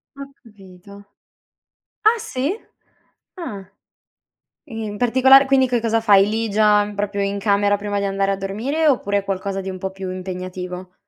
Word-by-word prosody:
Ho 275 0 -8 0.2
capito. 200 -2 -15 1.0
Ah, 450 +2 +5
sì? 345 - -3 0.8
Ah. 205 - -7 1.0
I 225 -4 -6
in 205 -1 -6
particolare 260 +4 +5
quindi 265 -1 +3
che 240 -2 0
cosa 225 0 +1
fai 200 -3 +5
lì 225 +1 -2
già, 210 0 +3
proprio 200 0 -2
in 200 0 -1
camera 205 0 +2
prima 205 0 -3
di 200 - -2
andare 195 0 0
a 195 - -1
dormire? 230 +12 -1
Oppure, 205 -8 +1
è 200 - -2
qualcosa 195 0 -3
di 190 - -6
un 185 - -6
po' 190 +1 -5
più 190 -1 -7
impegnativo? 185 0 -6
205 Hz, 160 wpm, -20 LUFS, 195-235 Hz, 1.0 s, Ah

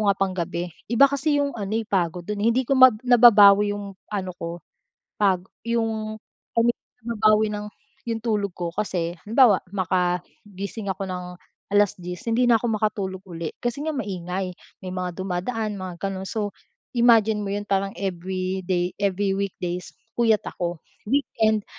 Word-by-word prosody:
nga 195 - +1
panggabi. 175 -2 -2 0.2
Iba 235 +4 +6
kasi 290 +1 +1
'yong 280 -1 0
ano, 200 -1 -4
eh, 225 - -1
pagod 175 -2 0
dun, 210 -1 -3
eh. 225 - +4
Hindi 260 +2 +1
ko - - +2
mab 255 -4 +8
nababawi 210 -4 +7
'yong 200 -1 -7 0.2
ano 190 -3 -2
ko 170 0 -6 0.6
pag 190 -3 +3 0.3
'yong 220 -2 -1 0.4
kami 235 +1 +5 0.3
babawi 215 -2 +3
ng 210 0 -4 0.4
'yong 225 -1 -1
tulog 205 -4 0
ko 175 -1 -3
kasi, 175 -5 -2
halimbawa, 225 -3 +5
makagising 185 +3 -2
ako 190 +1 -4
ng 180 -1 -6 0.4
10:00 180 -3 +1
hindi 245 +2 +3
na 230 - +6
ako 240 - -1
makatulog 195 -3 -2
uli. 165 -2 -5
Kasi 240 +4 -2
nga 315 - 0
maingay, 185 -4 -3 0.3
may 185 - -4
mga 180 -1 -4
dumadaan 200 +4 -2
mga 185 -2 -6
gano'n. 195 -1 -3
So, 205 -2 -2 0.4
imagine 225 -3 +4
mo 200 - -4
'yon 205 0 -3
parang 195 0 +1
everyday, 185 -1 -2
every 195 0 +1
weekdays 180 -3 -3 0.3
puyat 225 -3 +3
ako. 175 -1 -3 0.3
Weekend 220 -6 +1
200 Hz, 150 wpm, -24 LUFS, 185-220 Hz, 0.6 s, mab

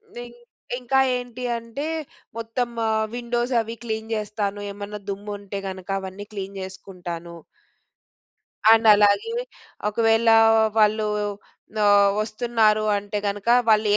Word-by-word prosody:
నింగ్ 240 0 -9 0.4
ఇంకా 260 +2 +1 0.2
ఏంటి 245 0 -7
అంటే 230 +5 -6 0.5
మొత్తం 230 +2 -2 0.2
ఆహ్, 220 0 +1
విండోస్ 240 +1 -2
అవీ 225 +1 -6
క్లీన్ 220 -1 -4
చేస్తాను. 210 -1 -3
ఏమన్నా 205 +1 -7
దుమ్ము 205 +1 -5
ఉంటే 200 0 -7
గనక 190 0 -8
అవన్నీ 190 +2 -8
క్లీన్ 195 -1 -6
చేసుకుంటాను. 180 -3 -8 1.4
అండ్ 225 0 +5
అలాగే 210 - +3 0.6
ఒకవేళా 225 +1 +4 0.4
వాళ్ళూ 215 0 +3 0.8
ఆహ్, 200 -1 +6
వస్తున్నారు 215 0 +1
అంటే 205 +1 -4
గనక 200 +1 -3 0.2
వాళ్ళు 215 -1 +4
215 Hz, 110 wpm, -23 LUFS, 200-230 Hz, 1.4 s, ఆహ్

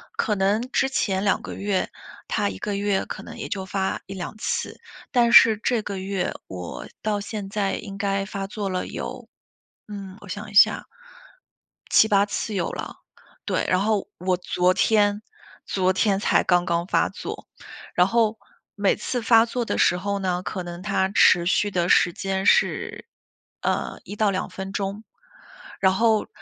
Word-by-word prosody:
可 210 - 0
能 200 +3 +2
之 265 - +2
前 195 -7 0
2 200 - +2
个 - - -7
月， 200 -1 -1 0.4
它 - - 0
1 95 - -7
个 205 - -3
月 200 -1 0
可 - - -7
能 - - -10
也 - - -6
就 190 -2 -3
发 190 0 -2
1-2 195 +2 -7
次， - - -3 0.3
但 235 -2 +3
是 220 -3 +8
这 230 +1 0
个 200 -2 -5
月， 190 -1 -2 0.2
我 90 -2 -7
到 210 -1 -1
现 205 -1 -6
在 200 -2 -1
应 195 -1 -6
该 195 -1 0
发 195 -1 -5
作 200 0 -4
了 185 -1 -2
有 - - -6 0.6
嗯， 195 -2 -8
我 205 - -12
想 205 +3 -6
一 - - -14
下， 205 - +5 1.0
7-8 205 -2 +5
次 210 +1 -4
有 185 -4 -1
了， - - -7 0.5
对。 - - 0
然 185 - +3
后 210 -1 0
我 180 0 0
昨 180 0 +1
天 205 0 +3 0.4
昨 185 -1 +1
天 195 0 +2
才 - - +2
刚 175 -1 +3
刚 170 -1 0
发 - - +2
作。 - - -7 0.5
然 180 +1 +5
后 225 0 +2 0.4
每 200 -1 +2
次 245 -2 -3
发 230 -1 +6
作 240 0 -2
的 - - -2
时 180 - +4
候 200 +2 -2
呢， 180 -1 -1
可 185 - -4
能 175 0 -8
它 190 -2 +1
持 175 -3 +5
续 205 +2 +2
的 175 -1 0
时 175 - +4
间 195 -2 -2
是， - - +2 0.5
呃， - - -2
1-2 205 -2 -1
分 190 0 -6
钟。 200 +2 -3 0.8
然 190 -1 +4
后 220 0 +2
200 Hz, 170 characters per minute, -24 LUFS, 190-210 Hz, 1.0 s, 是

